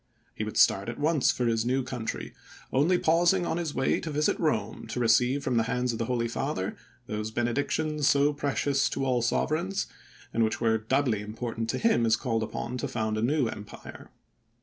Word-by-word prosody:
He - - -4
would - - -5
start 100 +4 +4
at 120 - -5
once 150 -2 +2
for 125 - +1
his 115 -1 +1
new 130 +2 0
country, 125 -3 -5 0.4
only 155 +7 +3
pausing 175 +2 +3
on 165 - -1
his 165 -4 -3
way 135 - +1
to 165 - -5
visit 150 0 +1
Rome - - -1
to - - -4
receive 125 +4 +3
from 130 -5 0
the 115 - +2
hands 125 -1 0
of 115 - -5
the 115 - 0
Holy 120 -1 0
Father 120 -5 -3 0.3
those 105 -2 -3
benedictions 145 +6 0
so 145 +1 +3
precious 140 -1 0
to 135 - -2
all 125 -2 +1
sovereigns, 170 - 0 0.5
and 115 - +2
which 110 - 0
were 110 -1 +2
doubly 120 -1 +1
important 115 +1 -4
to - - 0
him 225 - +2
as 110 - +4
called 115 -3 -1
upon 120 +3 -4
to - - -2
found 110 -2 -2
a 110 - -1
new 130 +2 +2
empire. 105 -2 -9
125 Hz, 195 wpm, -28 LUFS, 115-145 Hz, 0.5 s, start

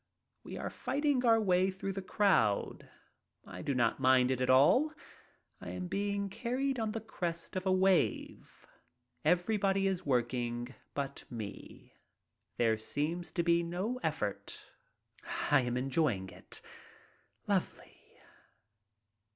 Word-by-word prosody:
We - - -7
are - - -4
fighting 285 -2 0
our 225 -1 +6
way 185 -2 +3
through 195 +1 -4
the 195 - -4
crowd. 185 - +1 0.6
I - - -8
do 140 -3 -1
not 120 0 +1
mind 130 -1 +4
it 130 -1 -1
at 130 - +1
all. 150 - +5 0.7
I - - -8
am 185 - -4
being 200 +2 -1
carried 255 +6 -2
on 220 -1 -1
the 225 - -2
crest 175 -7 -5
of 185 +1 -2
a - - +3
wave. 185 0 +1 0.6
Everybody 195 +1 +2
is 190 -2 0
working 120 -1 -1 0.2
but 140 -1 -4
me. 110 -4 -8 0.6
There 115 -2 +2
seems 155 +9 -3
to 170 - 0
be 170 0 +3
no 185 +9 -3
effort. - - -3 0.8
I 145 -2 +6
am 125 0 -2
enjoying 125 - 0
it - - -12 0.4
— - - -34
lovely. - - -2
175 Hz, 130 wpm, -32 LUFS, 130-200 Hz, 0.8 s, our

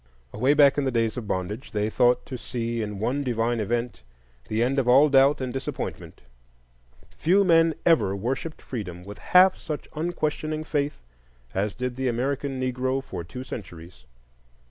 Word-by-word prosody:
Away 130 +7 +2
back 145 -1 +5
in - - 0
the 135 - +1
days 115 -2 0
of 120 -4 -6
bondage 100 +9 -4
they 105 0 0
thought 120 +3 +2
to 130 - -6
see 115 -1 -3
in 105 -2 -4
one 125 +8 -1
divine 120 -2 0
event 120 - -2 0.5
the 110 +2 0
end 135 +3 +1
of 130 - -1
all 135 +5 +6
doubt 135 +1 +5
and 130 -2 -4
disappointment; 135 0 -5 0.9
few 190 +5 +3
men 165 -3 +4
ever 110 - +3
worshipped 130 +10 -4
Freedom 90 -8 -6
with 100 +2 -10
half 185 +1 +5
such 150 -2 -5
unquestioning 155 -1 -2
faith 145 - -2 0.5
as 100 +1 -1
did 125 0 -4
the 130 0 -1
American 135 +2 -2
Negro 130 +1 -1
for 85 - -6
two 125 +9 -8
centuries. 85 - -10
125 Hz, 165 wpm, -25 LUFS, 110-145 Hz, 0.9 s, all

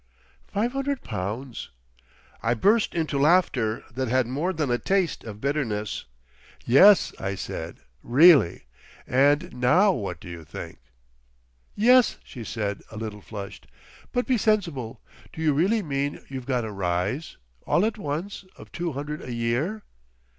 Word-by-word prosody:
"Five 225 +4 -1
hundred 275 0 -2
pounds!" 110 +5 -5 0.7
I 115 +1 +1
burst 205 - +2
into 155 -4 -1
laughter 140 -8 +2
that 130 +1 -2
had 130 +1 +2
more 145 +10 -1
than 150 -7 -1
a 120 - +1
taste 190 -4 0
of 105 -2 -8
bitterness. 115 -7 -2 0.6
"Yes," 190 - +6
I 95 0 -3
said, 85 -3 -6 0.2
"really! 140 - +5 0.4
and 140 +3 +2
now 125 +12 +4
what 95 - -4
do - - -12
you 85 -2 -8
think?" 70 - -9 1.0
"Yes," 245 +3 +5
she 120 - -9
said, 105 -3 -3
a 110 - -10
little 105 -2 -6
flushed; 100 -1 -9 0.4
"but 245 - 0
be 255 -4 +1
sensible! 170 - 0 0.3
Do 160 - -6
you 155 -2 +3
really 200 +9 +2
mean 140 -2 -3
you've 130 -2 -7
got 125 -4 0
a 110 - -5
Rise, 95 - -2 0.3
all 175 - +3
at 220 -1 -2
once, 175 +6 -4
of - - -13
two 170 -2 -3
hundred 150 +3 -5
a 125 - -7
year?" 120 - -1
140 Hz, 145 wpm, -25 LUFS, 110-180 Hz, 1.0 s, Yes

